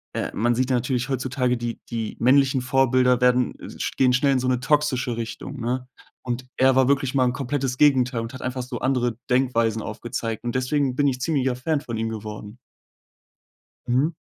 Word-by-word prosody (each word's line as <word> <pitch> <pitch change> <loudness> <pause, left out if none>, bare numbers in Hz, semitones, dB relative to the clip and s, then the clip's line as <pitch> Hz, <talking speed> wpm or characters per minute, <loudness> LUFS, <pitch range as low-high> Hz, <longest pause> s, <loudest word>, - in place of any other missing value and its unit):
äh, - - -2
man 120 +2 +1
sieht 130 +1 0
natürlich 125 +1 0
heutzutage, 130 -1 0
die 120 -1 -4
die 115 -2 -4
männlichen 130 +1 +4
Vorbilder 125 -1 +3
werden, 125 0 +3
äh, - - -9
sch - - -2
gehen 130 -1 +4
schnell 135 +3 +3
in 130 - +2
so 125 - -2
'ne 125 -1 +1
toxische 130 -3 +1
Richtung, 115 +4 -6
ne? 125 +2 -2 0.4
Und 125 0 -4
er 130 0 +4
war 130 -1 +4
wirklich 135 -1 +1
mal 130 -2 +3
'n 125 - +1
komplettes 130 -1 -2
Gegenteil 130 -4 +3
und 115 0 -6
hat 130 - -8
einfach 130 0 -3
so 125 -2 -6
andere 125 -3 0
Denkweisen 115 -4 +1
aufgezeigt. 115 0 -4
Und 120 -1 -3
deswegen 130 0 0
bin 145 0 +2
ich 130 -2 -1
ziemlicher 130 -3 0
Fan 145 +4 -1
von 115 -4 -6
ihm 115 0 -2
geworden. 105 0 -7 1.3
Mhm. 140 +7 +2
125 Hz, 190 wpm, -23 LUFS, 120-130 Hz, 1.3 s, männlichen